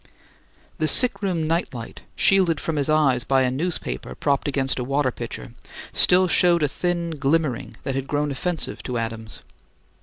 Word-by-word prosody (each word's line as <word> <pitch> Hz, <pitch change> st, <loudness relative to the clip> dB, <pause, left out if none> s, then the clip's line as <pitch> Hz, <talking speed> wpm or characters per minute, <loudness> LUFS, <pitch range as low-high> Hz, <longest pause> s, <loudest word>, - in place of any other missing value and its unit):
The 155 Hz, -, +1 dB
sick 250 Hz, +8 st, +4 dB
room 180 Hz, -5 st, -1 dB
night 165 Hz, -4 st, -1 dB
light, 115 Hz, -1 st, -8 dB
shielded 185 Hz, -5 st, +3 dB
from 160 Hz, -2 st, -3 dB
his 145 Hz, +1 st, 0 dB
eyes 140 Hz, -6 st, +3 dB
by 135 Hz, -1 st, +2 dB
a 125 Hz, -, 0 dB
newspaper 165 Hz, +7 st, -4 dB
propped 140 Hz, -1 st, 0 dB
against 135 Hz, -2 st, 0 dB
a -, -, -2 dB
water 135 Hz, +1 st, 0 dB
pitcher, 60 Hz, -, -7 dB, 0.4 s
still 185 Hz, +1 st, +6 dB
showed 175 Hz, -2 st, +3 dB
a -, -, +3 dB
thin 170 Hz, +3 st, -2 dB
glimmering 145 Hz, -3 st, -1 dB
that 135 Hz, -, -3 dB
had 135 Hz, 0 st, -3 dB
grown 145 Hz, 0 st, -1 dB
offensive 165 Hz, +5 st, -3 dB
to 125 Hz, -2 st, -4 dB
Adams. 115 Hz, -1 st, -6 dB
145 Hz, 170 wpm, -23 LUFS, 130-170 Hz, 0.4 s, still